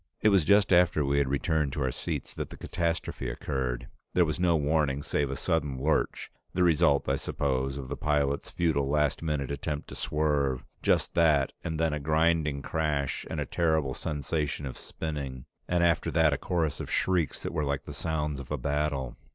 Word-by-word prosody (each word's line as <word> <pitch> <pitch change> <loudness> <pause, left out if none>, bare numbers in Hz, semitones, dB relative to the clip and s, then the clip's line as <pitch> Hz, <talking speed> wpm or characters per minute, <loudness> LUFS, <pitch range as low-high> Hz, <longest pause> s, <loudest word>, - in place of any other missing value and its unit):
It 110 - +4
was 100 -5 +4
just 100 0 +5
after 85 -4 +4
we 70 +1 +2
had 70 -2 +1
returned 70 0 0
to 75 - -1
our 65 - 0
seats - - -4
that - - -5
the - - -10
catastrophe 85 -2 -2
occurred. 65 -4 -3 0.3
There 90 - +5
was 80 +1 -2
no 90 -2 +3
warning 75 -2 +1
save 70 -2 0
a 70 - -2
sudden 75 -5 -1
lurch, 75 +4 0 0.2
the 90 - +3
result, 75 -4 +3
I - - +2
suppose, 65 -1 -1
of 70 -2 -6
the 70 - -3
pilot's 70 -2 0
futile 75 -5 0
last 75 -1 +1
minute 75 -4 -1
attempt 75 +1 -4
to - - -8
swerve 75 -4 0 0.2
just - - +2
that 75 -5 +3
and 80 -1 -3
then 80 -2 +2
a 75 - -1
grinding 80 -1 +1
crash 75 -3 -1
and - - -3
a - - -1
terrible 80 -5 +1
sensation 75 0 -2
of 65 - -5
spinning, 70 -5 -5 0.2
and 85 -1 +2
after 85 -1 +2
that 80 -1 +3
a - - 0
chorus 80 -5 -1
of - - -5
shrieks 90 -5 0
that - - -3
were 75 - 0
like 70 -1 -1
the 75 - -8
sounds 75 -1 -2
of 70 - -9
battle. 70 -1 -1
75 Hz, 190 wpm, -29 LUFS, 70-80 Hz, 0.3 s, just